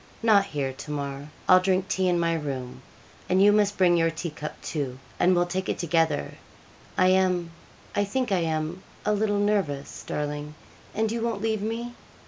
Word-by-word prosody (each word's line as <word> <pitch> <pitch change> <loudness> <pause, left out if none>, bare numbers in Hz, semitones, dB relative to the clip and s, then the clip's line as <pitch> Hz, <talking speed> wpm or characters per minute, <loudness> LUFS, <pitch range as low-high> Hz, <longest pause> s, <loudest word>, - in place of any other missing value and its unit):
'Not 210 -3 +5
here, 140 -7 -3
Tamar; 140 0 -5 0.2
I'll 185 - +8
drink 185 0 +1
tea 190 -3 +1
in 175 -1 +2
my 165 0 +2
room; 135 -6 -4 0.5
and 185 - +3
you 205 +1 +7
must 205 -1 +2
bring 180 -2 +5
your 165 -1 +3
tea 165 +1 -5
cup, 150 0 -7
too, 135 -5 -3 0.2
and 180 +1 +4
we'll 175 0 +3
take 185 +2 -3
it - - -1
together. 165 - 0 0.6
I 185 0 +5
am 185 -2 +2 0.4
I 205 - +3
think 245 +3 -1
I 190 - +3
am 160 +2 -2 0.2
a 210 - +2
little 205 0 +1
nervous, 200 -9 -1
darling, 150 0 -3 0.4
and 220 +1 +1
you 230 0 -2
won't 225 -3 -2
leave 220 -2 0
me?' 230 +3 -3
180 Hz, 180 wpm, -26 LUFS, 150-205 Hz, 0.6 s, I'll